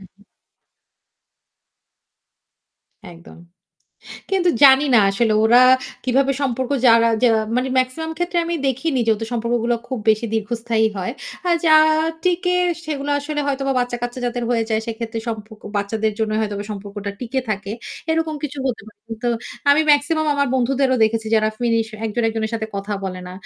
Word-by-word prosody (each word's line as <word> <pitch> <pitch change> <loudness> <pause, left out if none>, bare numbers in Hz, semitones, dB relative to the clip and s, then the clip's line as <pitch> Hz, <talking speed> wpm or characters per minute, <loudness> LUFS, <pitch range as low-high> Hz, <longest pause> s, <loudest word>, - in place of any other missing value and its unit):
উহুম। 195 +1 -19 2.9
একদম। 170 0 -14 0.9
কিন্তু 375 -2 +2
জানি 270 0 +8
না - - +7
আসলে 220 +2 +1
ওরা 240 +2 +6 0.5
কিভাবে 270 +2 +2
সম্পর্ক 260 -1 -2 0.2
যারা 230 0 +6
যে 250 - +6 0.3
মানে 255 +1 0
মেক্সিমাম 255 +6 -1
ক্ষেত্রে 350 0 -1
আমি 340 - -2
দেখিনি 270 +2 -1
যেহেতু 225 0 +1
সম্পর্কগুলো 235 0 0
খুব 260 - -3
বেশি 220 +2 +3
দীর্ঘস্থায়ী 225 +1 0
হয়। 190 +4 -3 0.3
আর 350 - +3
যা 315 - +6 0.5
টিকে 360 0 +1 0.3
সেগুলো 290 -2 -3
আসলে 295 +1 -3
হয়তো 275 -1 -1
বা - - +2
বাচ্চা-কাচ্চা 245 0 -4
যাদের 245 0 -3
হয়ে 235 -2 +2
যায় 220 0 +1
সেক্ষেত্রে 230 0 -4
সম্পর্ক 220 -1 -7
বাচ্চাদের 215 +2 -1
জন্য 220 -1 -1
হয়তোবা 205 -1 -3
সম্পর্কটা 205 0 -6
টিকে 255 +2 -2
থাকে। 200 -1 -3 0.4
এরকম 320 -1 0
কিছু 290 -1 -5
হতে 245 -5 -3
পারে। 210 -1 -17
কিন্তু 230 +2 -3 0.4
আমি 285 +2 +5
মেক্সিমাম 310 +2 +1
আমার 280 0 +1
বন্ধুদেরও 260 +1 +1
দেখেছি 220 0 -1
যারা 215 -1 +3
ফিনিশ 230 -2 +1 0.2
একজন 225 +2 -2
একজনের 220 -1 -3
সাথে 220 -1 -3
কথা 200 +1 -4
বলে 185 -1 -5
না। - - -9
235 Hz, 150 wpm, -20 LUFS, 220-275 Hz, 2.9 s, জানি